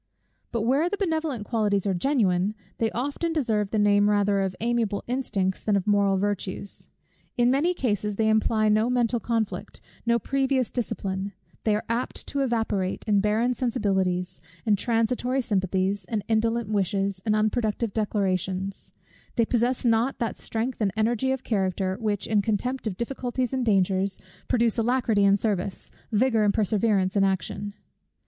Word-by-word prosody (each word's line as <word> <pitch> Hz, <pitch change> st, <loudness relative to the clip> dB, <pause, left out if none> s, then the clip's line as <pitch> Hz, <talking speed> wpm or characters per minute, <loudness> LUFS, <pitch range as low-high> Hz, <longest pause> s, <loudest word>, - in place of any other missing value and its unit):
But 230 Hz, -, -1 dB
where 275 Hz, +9 st, +2 dB
the 410 Hz, -, -2 dB
benevolent 315 Hz, -, -1 dB
qualities 210 Hz, -4 st, 0 dB
are 195 Hz, -, +1 dB
genuine, 200 Hz, -3 st, +1 dB, 0.2 s
they 225 Hz, -, +2 dB
often 285 Hz, +8 st, -2 dB
deserve 220 Hz, -9 st, 0 dB
the 220 Hz, -, -1 dB
name 205 Hz, 0 st, +4 dB
rather 205 Hz, -1 st, +2 dB
of 190 Hz, -1 st, -2 dB
amiable 230 Hz, -3 st, 0 dB
instincts, 200 Hz, -7 st, -1 dB
than 210 Hz, -, +1 dB
of 195 Hz, -2 st, 0 dB
moral 200 Hz, -2 st, +3 dB
virtues. 200 Hz, 0 st, -3 dB, 0.5 s
In 240 Hz, 0 st, +4 dB
many 325 Hz, +7 st, +2 dB
cases, 210 Hz, -, -1 dB
they 220 Hz, +1 st, +1 dB
imply 220 Hz, 0 st, +2 dB
no 215 Hz, +2 st, +3 dB
mental 245 Hz, -1 st, +1 dB
conflict, 225 Hz, -2 st, -2 dB, 0.2 s
no 235 Hz, 0 st, +3 dB
previous 265 Hz, +1 st, 0 dB
discipline: 200 Hz, -4 st, -3 dB, 0.3 s
they 215 Hz, -2 st, +3 dB
are 210 Hz, -, -3 dB
apt 235 Hz, +2 st, -2 dB
to 280 Hz, -, -2 dB
evaporate 225 Hz, -7 st, -1 dB
in 205 Hz, -2 st, +4 dB
barren 215 Hz, +5 st, +2 dB
sensibilities, 190 Hz, -7 st, -1 dB, 0.2 s
and 215 Hz, -2 st, +4 dB
transitory 240 Hz, +4 st, 0 dB
sympathies, 195 Hz, -3 st, 0 dB
and 215 Hz, -3 st, -2 dB
indolent 225 Hz, 0 st, +1 dB
wishes, 195 Hz, -1 st, 0 dB
and 215 Hz, -1 st, +1 dB
unproductive 215 Hz, 0 st, 0 dB
declarations: 195 Hz, -2 st, -1 dB, 0.4 s
they 230 Hz, -, +3 dB
possess 245 Hz, +2 st, 0 dB
not 235 Hz, +3 st, +2 dB
that 230 Hz, -3 st, -2 dB
strength 230 Hz, +2 st, -3 dB
and 200 Hz, -2 st, +2 dB
energy 235 Hz, +4 st, +1 dB
of 265 Hz, -1 st, -2 dB
character, 190 Hz, -3 st, 0 dB
which, 210 Hz, -3 st, -1 dB
in 210 Hz, -2 st, +2 dB
contempt 235 Hz, +4 st, -1 dB
of 190 Hz, -4 st, -3 dB
difficulties 250 Hz, 0 st, -2 dB
and 255 Hz, -2 st, -1 dB
dangers, 195 Hz, -1 st, +2 dB, 0.3 s
produce 235 Hz, -2 st, +2 dB
alacrity 230 Hz, -3 st, +2 dB
in 200 Hz, 0 st, +5 dB
service, 200 Hz, -3 st, -2 dB, 0.2 s
vigour 225 Hz, 0 st, +3 dB
and 205 Hz, -1 st, +2 dB
perseverance 205 Hz, -2 st, +1 dB
in 200 Hz, -, +4 dB
action. 195 Hz, +1 st, -2 dB
215 Hz, 155 wpm, -26 LUFS, 200-240 Hz, 0.5 s, in